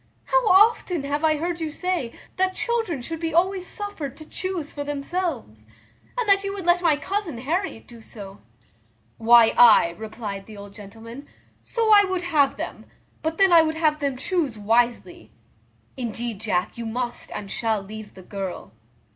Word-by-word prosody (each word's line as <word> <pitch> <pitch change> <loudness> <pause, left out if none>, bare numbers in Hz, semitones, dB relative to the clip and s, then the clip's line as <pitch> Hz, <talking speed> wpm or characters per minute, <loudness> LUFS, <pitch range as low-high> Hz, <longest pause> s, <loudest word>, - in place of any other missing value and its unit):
How - - +2
often 375 -5 +4
have 290 +2 -2
I 310 -1 +3
heard 340 +2 -3
you 320 - -2
say, 335 -6 -2 0.3
that 375 0 +1
children 450 - -1
should 325 +4 -5
be 325 -1 -3
always 370 +1 +1
suffered 405 - -5
to 310 - -11
chuse 370 -5 -4
for 290 - -4
themselves, 285 - -4 0.5
and 485 -3 -1
that 395 0 +4
you 395 - -2
would 385 -4 -6
let 350 0 +4
my 335 -4 +4
cousin 380 - -3
Harriet 305 - -3
do 235 -1 -14
so?" 200 -3 -11 0.8
"Why, 230 0 +6
ay," 215 -8 +7
replied 210 -3 -6
the 215 -2 -11
old 200 0 -11
gentleman, 225 +6 -11 0.3
"so 455 -2 0
I 410 -1 +8
would 375 -2 -2
have 300 -5 +2
them; - - -6 0.4
but 320 +1 -2
then 390 -2 +5
I 335 - +9
would 315 0 -1
have 310 -2 +1
them 280 -3 -2
chuse 285 - -1
wisely. 235 +3 0 0.7
Indeed, 235 -3 -4
Jack, 195 0 -1
you 230 - -4
must 240 +2 -4
and 200 -1 -6
shall 225 -2 0
leave 210 +2 -10
the 185 - -12
girl." 195 -1 -6
290 Hz, 170 wpm, -24 LUFS, 225-360 Hz, 0.8 s, I